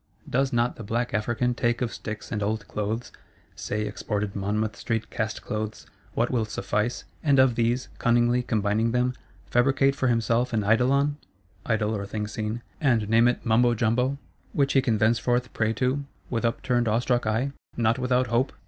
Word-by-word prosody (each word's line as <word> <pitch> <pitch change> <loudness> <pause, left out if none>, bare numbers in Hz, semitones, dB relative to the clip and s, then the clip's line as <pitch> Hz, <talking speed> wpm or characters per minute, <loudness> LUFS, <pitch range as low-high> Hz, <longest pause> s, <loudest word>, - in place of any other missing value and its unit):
Does 135 +1 +1
not 120 +1 +1
the 115 - -7
Black 120 +3 -2
African 120 +3 0
take 120 0 0
of 120 -3 -2
Sticks 110 -1 -7
and 105 - -2
Old 105 +1 -2
Clothes 110 +3 -3 0.4
(say, 105 +1 -3
exported 105 -1 -3
Monmouth 105 +2 -1
Street 115 -2 -3
cast 110 -1 -3
clothes) 110 0 -4 0.3
what 120 +1 +1
will 120 -3 +1
suffice, 105 +3 -2 0.2
and 145 -3 +4
of 130 -2 +5
these, 120 +2 0
cunningly 120 +1 +3
combining 110 0 0
them, 125 +1 +1 0.4
fabricate 135 +2 +3
for 130 - 0
himself 120 +1 +1
an 110 -2 +1
Eidolon 135 +7 +3 0.5
(Idol, 110 -1 +1
or 100 -1 -4
Thing 105 +1 -3
Seen), 110 +2 -4 0.2
and 120 -7 +2
name 115 +2 +5
it 120 - -1
Mumbo 120 +1 +4
Jumbo; 125 +5 +1 0.4
which 140 -1 +2
he 135 - +5
can 115 -4 +1
thenceforth 120 +3 +1
pray 110 -1 +1
to, 130 +4 0 0.3
with 115 -1 0
upturned 120 -1 +1
awestruck 120 +1 +1
eye, 115 +6 0 0.3
not 115 +1 +2
without 125 0 +2
hope? 120 +3 0
120 Hz, 170 wpm, -26 LUFS, 110-125 Hz, 0.5 s, of